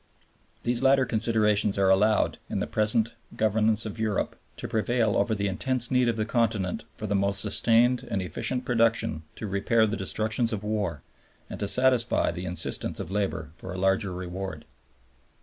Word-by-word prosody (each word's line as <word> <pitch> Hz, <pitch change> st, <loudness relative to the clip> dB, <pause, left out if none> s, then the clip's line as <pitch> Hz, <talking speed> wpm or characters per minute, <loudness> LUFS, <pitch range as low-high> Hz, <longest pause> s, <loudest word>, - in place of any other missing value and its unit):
These 120 Hz, 0 st, 0 dB
latter 135 Hz, 0 st, +4 dB
considerations 105 Hz, -3 st, +2 dB
are 95 Hz, -1 st, +3 dB
allowed, 105 Hz, +3 st, +2 dB
in -, -, -2 dB
the -, -, -1 dB
present 110 Hz, +1 st, +1 dB, 0.3 s
governance 110 Hz, 0 st, +1 dB
of 110 Hz, +1 st, -6 dB
Europe, 110 Hz, -2 st, -1 dB, 0.2 s
to -, -, -5 dB
prevail 115 Hz, 0 st, 0 dB
over 110 Hz, -, +1 dB
the 100 Hz, 0 st, -1 dB
intense 120 Hz, +6 st, 0 dB
need 125 Hz, -1 st, +3 dB
of 115 Hz, -, +1 dB
the 110 Hz, -, 0 dB
Continent 110 Hz, -4 st, -1 dB
for 110 Hz, -, -5 dB
the 100 Hz, -, -2 dB
most 100 Hz, 0 st, +2 dB
sustained 115 Hz, +4 st, +3 dB
and 100 Hz, -, -1 dB
efficient 125 Hz, +8 st, -3 dB
production 115 Hz, -10 st, +1 dB
to -, -, -6 dB
repair 105 Hz, +3 st, +1 dB
the 110 Hz, 0 st, -2 dB
destructions 110 Hz, +5 st, -1 dB
of 105 Hz, -2 st, -4 dB
war, 105 Hz, -8 st, -3 dB, 0.5 s
and -, -, -7 dB
to 100 Hz, -, -2 dB
satisfy 125 Hz, +1 st, +3 dB
the 90 Hz, 0 st, -6 dB
insistence 90 Hz, 0 st, 0 dB
of 85 Hz, -, -6 dB
labor 95 Hz, -7 st, -2 dB
for 90 Hz, -, -8 dB
a -, -, -6 dB
larger 95 Hz, +1 st, +1 dB
reward. 90 Hz, -2 st, -6 dB
110 Hz, 170 wpm, -26 LUFS, 95-115 Hz, 0.5 s, latter